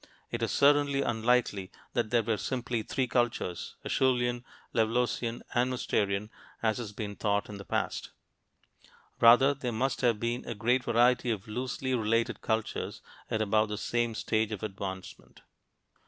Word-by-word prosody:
It - - -3
is - - 0
certainly 140 -1 +4
unlikely 110 -4 +1 0.2
that 115 -3 0
there 115 0 +3
were 110 0 0
simply 120 -1 -2
three 130 +4 -1
cultures, 120 -7 -1
"Acheulean," 120 -2 +1 0.3
"Levalloisian," 120 +1 0
and 125 +1 +2
"Mousterian," 105 -4 -1 0.3
as 110 +1 +1
has 110 -4 -5
been 105 -1 -5
thought 100 0 0
in 100 -1 -7
the 100 - -9
past. - - -2 1.1
Rather 120 +4 +7
there 130 -3 -4
must 130 +4 -1
have 120 -4 +2
been 120 +2 -2
a 115 - -3
great 125 +4 +1
variety 120 +1 +3
of 110 -1 -2
loosely 130 +3 -3
related 115 -1 +1
cultures 110 -1 -2 0.3
at 110 -1 +1
about 110 +1 +2
the 105 - -3
same 120 +1 -1
stage 110 0 0
of 105 -2 -5
advancement. 95 -2 -7
115 Hz, 150 wpm, -30 LUFS, 110-125 Hz, 1.1 s, Rather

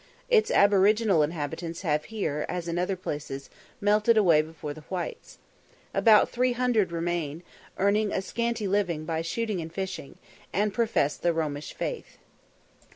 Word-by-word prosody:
Its 450 -3 +4
aboriginal 200 -2 +4
inhabitants 165 +3 -3
have 150 -3 0
here, 160 -9 -2
as 175 -1 -3
in 170 +1 -1
other 180 +2 0
places, 145 -6 -6 0.3
melted 210 +3 +3
away 170 -7 +5
before 155 -1 -7
the 155 - -11
whites. 180 -2 -5 0.6
About 215 -2 +6
three 250 0 +1
hundred 240 -7 +1
remain, 170 -2 -2 0.3
earning 205 +2 +2
a - - 0
scanty 235 -1 -2
living 185 -6 0
by 160 0 -1
shooting 210 +2 -2
and 160 0 -7
fishing, 180 -5 -5 0.3
and 205 +2 0
profess 220 -11 +1
the 175 - +1
Romish 150 -2 -3
faith. - - -5
180 Hz, 145 wpm, -27 LUFS, 160-210 Hz, 0.6 s, About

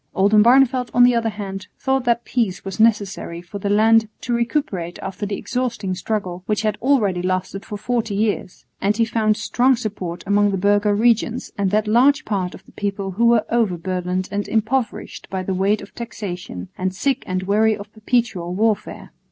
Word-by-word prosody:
Oldenbarneveldt 240 +6 +4
on 245 - +7
the 245 0 +6
other 230 -1 +1
hand 195 -2 -6
thought 265 -1 0
that 235 0 +1
peace 225 -8 -1
was 195 +1 -6
necessary 205 -6 +1
for 190 +4 -8
the 200 - -2
land 220 +1 +4
to 245 - -2
recuperate 235 - -1
after 195 +2 -5
the 200 - -3
exhausting 235 -7 -2
struggle, 185 -2 -3
which 210 0 0
had 215 -1 +1
already 215 -9 +2
lasted 185 +2 -2
for 210 - -6
forty 225 -1 -2
years; 205 -3 -2 0.2
and 205 +2 +1
he 230 - +3
found 215 -2 +1
strong 250 +4 +2
support 195 -7 -5
among 205 +1 +3
the 195 - -1
burgher 205 +2 +2
regents 230 +2 +1
and 200 -3 0
that 210 +2 +1
large 275 +7 +4
part 190 -4 -2
of - - -15
the - - -18
people 200 -1 -3
who 230 +6 +2
were 235 -2 +4
over 225 -7 +1
burdened 185 +1 -2
and 205 0 -2
impoverished 225 +2 -2
by 190 -1 -3
the 190 - -2
weight 200 +3 +1
of 200 - -13
taxation, 180 - -6
and 185 0 -1
sick 275 +7 0
and 185 0 -2
weary 215 +2 +2
of 205 0 -11
perpetual 215 -6 -1
warfare. 215 +1 -1
210 Hz, 185 wpm, -21 LUFS, 190-230 Hz, 0.2 s, on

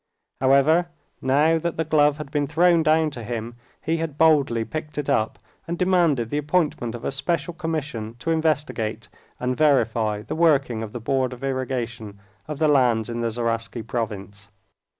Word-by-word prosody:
However, 140 +6 +4 0.3
now 150 +5 +3
that 170 +1 -3
the 160 - +1
glove 150 -2 +3
had 150 -2 -8
been 145 -1 0
thrown 170 +3 +4
down 155 0 +3
to 120 -4 -7
him, 115 0 -5 0.3
he 165 +1 0
had 160 -3 -4
boldly 140 -8 +3
picked 155 +1 -6
it 145 -1 -1
up 110 -5 0 0.3
and 170 +1 -3
demanded 170 -11 +2
the 145 - 0
appointment 150 -6 0
of 120 - -8
a - - -1
special 165 +6 -2
commission 150 -10 -4
to 125 +7 -2
investigate 145 -9 -1 0.3
and 125 0 -1
verify 115 -8 +2
the - - -5
working 140 -8 +2
of 110 -2 -6
the 120 - -6
Board 130 +2 0
of 125 +2 -11
Irrigation 120 -6 -3 0.3
of 150 -1 -5
the 155 +1 +2
lands 125 -6 +3
in 120 0 -3
the 115 - 0
Zaraisky 115 0 -3
province. 105 -4 -5
135 Hz, 170 wpm, -23 LUFS, 115-155 Hz, 0.3 s, However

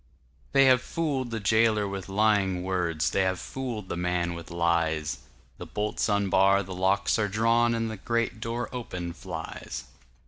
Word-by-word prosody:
They 135 0 +6
have 130 -1 +5
fooled 140 -5 -2
the 115 -1 -3
jailer 110 0 +3
with 100 -1 -6
lying 100 -3 +2
words, 90 -4 0
They 100 - +2
have 95 -1 0
fooled 120 -5 -5
the - - -3
man 90 0 -1
with 85 -1 -8
lies; 85 -2 0 0.4
The - - -7
bolts 105 +2 -1
unbar, 100 -1 +3
the 95 0 -7
locks 95 +4 +1
are 105 - +2
drawn, 115 +3 +2
And 115 0 -1
the 110 - -6
great 115 +2 -1
door 115 +2 -3
open 90 -8 -5
flies. 85 - -6
100 Hz, 165 wpm, -27 LUFS, 90-115 Hz, 0.4 s, They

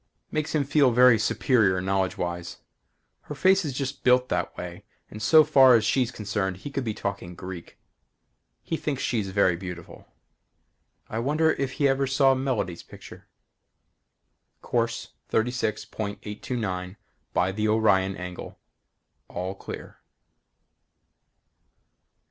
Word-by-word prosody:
Makes 155 +1 -2
him 150 - +2
feel 140 -1 +3
very 125 -1 +6
superior 110 -3 +2
knowledgewise. 90 -2 -2 0.7
Her 150 - -4
face 190 +5 +4
is 150 - -3
just 135 +1 -4
built 125 0 +4
that 90 -1 -2
way 90 0 -7 0.3
and 105 - -8
so 155 +8 +7
far 130 -4 +6
as 110 -1 +2
she's 125 +1 +2
concerned 100 -3 -3
he 140 +9 -8
could 135 -1 -2
be 110 -3 -3
talking 100 -4 -5
Greek. 90 -1 -9 0.9
He 165 - -2
thinks 140 -4 -3
she's 110 -5 -1
very 95 -2 +3
beautiful. 90 -1 -9 1.0
I 110 - -4
wonder 155 +6 +2
if 135 -1 -2
he 140 - +2
ever 135 0 +1
saw 135 0 +4
Melody's 125 -10 -2
picture? - - -13 1.4
Course 115 -1 -1 0.2
36.829 105 -4 -3 0.4
by 90 +1 +1
the 105 +2 -1
Orion 100 -3 +2
angle. 90 0 -8 0.7
All 90 +2 -4
clear. 100 - -9
110 Hz, 120 wpm, -26 LUFS, 95-135 Hz, 1.4 s, so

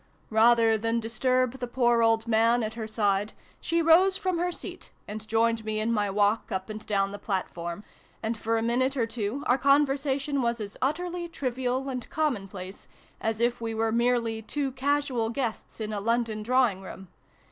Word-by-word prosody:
Rather 225 0 +5
than 230 +2 0
disturb 255 +3 0
the 245 - -3
poor 240 -1 +2
old 225 0 +3
man 230 +1 +3
at 215 0 -3
her 225 -1 -5
side, 205 -1 0 0.3
she 335 0 0
rose 365 +4 +5
from 370 -2 -1
her 355 +1 0
seat, - - -8 0.2
and 215 +1 -6
joined 225 +1 +2
me 215 0 -2
in 220 +2 0
my 210 -3 +1
walk 205 +3 +1
up 190 +2 -3
and 215 0 -7
down 195 -1 +1
the 205 - -7
platform, 180 -2 -4 0.4
and 225 +1 -1
for 225 +1 -1
a 225 - 0
minute 255 +4 +1
or 235 - +2
two 225 +4 -3
our 250 +2 +3
conversation 280 0 +2
was 235 -1 0
as 205 -1 -6
utterly 345 +5 -2
trivial 260 -3 -2
and 250 -3 -5
commonplace 195 -11 -3 0.3
as 225 0 -2
if 240 0 +1
we 225 -1 -3
were 225 0 +1
merely 235 -1 +1
two 275 +4 -2
casual 265 -3 0
guests 235 -3 -4
in 215 -1 -3
a 205 - -2
London 230 -1 0
drawing 240 -4 +2
room. 190 0 -10
230 Hz, 180 wpm, -27 LUFS, 215-260 Hz, 0.4 s, Rather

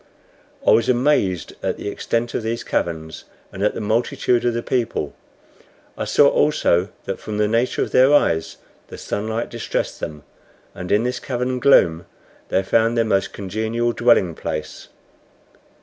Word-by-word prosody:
I - - +6
was 115 - +3
amazed 120 - +1
at - - -2
the - - -6
extent 115 +3 -2
of - - -1
these 115 +1 -3
caverns, 80 -2 -3 0.3
and 95 - -8
at 105 - +1
the - - -3
multitude 115 +2 0
of 120 -1 +1
the 120 - -2
people. 115 - -2 0.8
I - - -3
saw 145 - +5
also 100 - +2 0.2
that 95 - -4
from 105 -1 -5
the 105 0 +2
nature 115 +3 +1
of - - -6
their 130 +2 +5
eyes 80 - +2 0.3
the - - -10
sunlight 110 +3 -3
distressed 115 -2 -3
them, 75 -1 -6 0.5
and 90 -1 -7
in 105 +2 +3
this 125 +1 -2
cavern 125 0 -2
gloom 85 -11 +4 0.4
they 95 - +1
found 115 +4 +2
their 115 - +3
most 100 -3 0
congenial 110 +4 -2
dwelling 115 -9 +3
place. 75 0 -6
110 Hz, 160 wpm, -21 LUFS, 95-120 Hz, 0.8 s, I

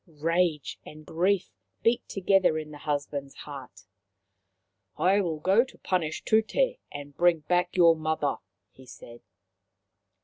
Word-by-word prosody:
Rage 165 0 -1
and 155 0 -12
grief 185 +4 0 0.3
beat 230 +1 +1
together 195 -4 +2
in 155 -1 -6
the 145 - -10
husband's 145 -2 -3
heart. 130 -9 -10 0.6
" 95 0 -52 0.3
I 190 +3 +3
go 190 +4 +2
to 260 - -15
punish 165 -4 -2
Tute 485 - +1
and 145 0 -9
bring 175 -1 +3
back 180 +3 0
your 170 -2 +6
mother/ 155 -2 -1 0.2
' - - -54
he 130 -1 -17
said. 120 -1 -12
160 Hz, 135 wpm, -27 LUFS, 145-185 Hz, 0.6 s, your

